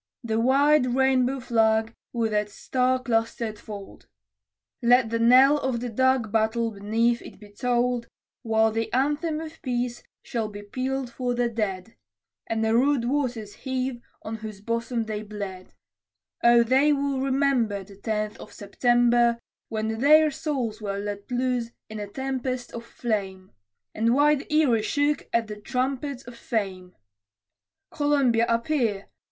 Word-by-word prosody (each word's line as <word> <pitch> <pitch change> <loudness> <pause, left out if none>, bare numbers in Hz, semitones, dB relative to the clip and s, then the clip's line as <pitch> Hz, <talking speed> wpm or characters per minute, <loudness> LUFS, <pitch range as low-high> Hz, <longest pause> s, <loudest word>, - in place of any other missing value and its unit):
The 225 -1 -1
wide 265 +1 +3
rainbow 265 0 +2
flag 225 -2 +2 0.2
with 225 -3 -1
its 210 -1 -1
star 255 0 +1
clustered 225 -3 -1
fold! 205 -2 -10 0.7
Let 240 -1 +4
the 230 - 0
knell 260 +5 +6
of 245 -3 -2
dark 260 -2 +2
Battle 225 +1 +1
beneath 225 +4 0
it - - -12
be 210 -1 -14
tolled, 245 +2 0 0.3
While 220 -1 +2
the 225 +1 -2
anthem 295 +4 0
of 320 0 -9
Peace 245 -1 -2 0.2
shall 225 -3 -2
be 205 0 -9
pealed 255 +4 -3
for 245 0 -2
the 240 0 +1
dead, 210 -3 -3 0.5
And 225 0 0
the 220 - +2
rude 265 0 +3
waters 245 -6 -2
heave, 260 -1 -3 0.2
on 225 +1 -5
whose 215 -2 -8
bosom 230 +2 -2
they 215 -1 -4
bled: 200 -3 -7 0.7
Oh, 235 0 +6
they 265 +5 +3
will 280 -2 0
remember, 260 -7 +1
The 195 0 -15
Tenth 215 0 -3
of - - -11
September, 240 +2 +2 0.3
When 220 0 -2
their 305 +3 +6
souls 255 -7 -3
were 200 -1 -3
let 205 0 -5
loose 250 -1 -1 0.2
in 215 - -6
a 205 - -5
tempest 255 +1 -4
of 235 - -6
flame, 200 -6 -4 0.4
And 230 +2 +2
wide 290 0 +2
Erie 285 -8 +3
shook 290 +6 0
at 230 -1 +1
the 210 -1 -8
trumpet 260 +3 -2
of 245 - -9
Fame. 190 -6 -4 1.0
Columbia, 275 -6 +2
appear! 230 -4 0
235 Hz, 145 wpm, -25 LUFS, 220-260 Hz, 1.0 s, knell